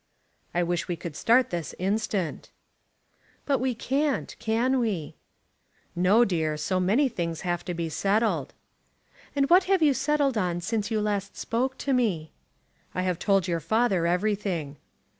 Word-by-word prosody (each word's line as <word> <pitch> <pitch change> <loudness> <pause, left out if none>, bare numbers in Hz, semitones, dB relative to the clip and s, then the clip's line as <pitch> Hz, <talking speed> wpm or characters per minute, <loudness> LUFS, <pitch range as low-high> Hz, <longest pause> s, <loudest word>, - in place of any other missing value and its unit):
"I 175 - +3
wish 175 0 -1
we 175 - -1
could 170 -2 -7
start 240 +6 +3
this 170 -2 -4
instant." 195 -2 -2 1.0
"But 275 -3 +1
we 255 0 0
can't, 275 +4 -1
can 240 +4 +1
we?" 200 -11 -2 0.8
"No, 195 +7 +4
dear. 160 -6 -1
So 185 +5 -1
many 215 +11 +3
things 170 -8 -3
have 175 -2 -2
to 180 - -3
be 170 0 -2
settled." 195 - 0 0.8
"And 275 -1 +2
what 365 +3 +6
have 380 -3 +3
you 290 -2 +5
settled 275 -2 +1
on 175 -3 -1
since 210 +3 -2
you 220 -2 0
last 200 -2 -2
spoke 255 +3 -1
to 275 - -1
me?" 195 -11 0 0.6
"I 185 - 0
have 180 -2 -1
told 195 -3 +2
your 170 -2 0
father 190 0 +1
everything." 180 -5 -1
200 Hz, 155 wpm, -26 LUFS, 175-245 Hz, 1.0 s, what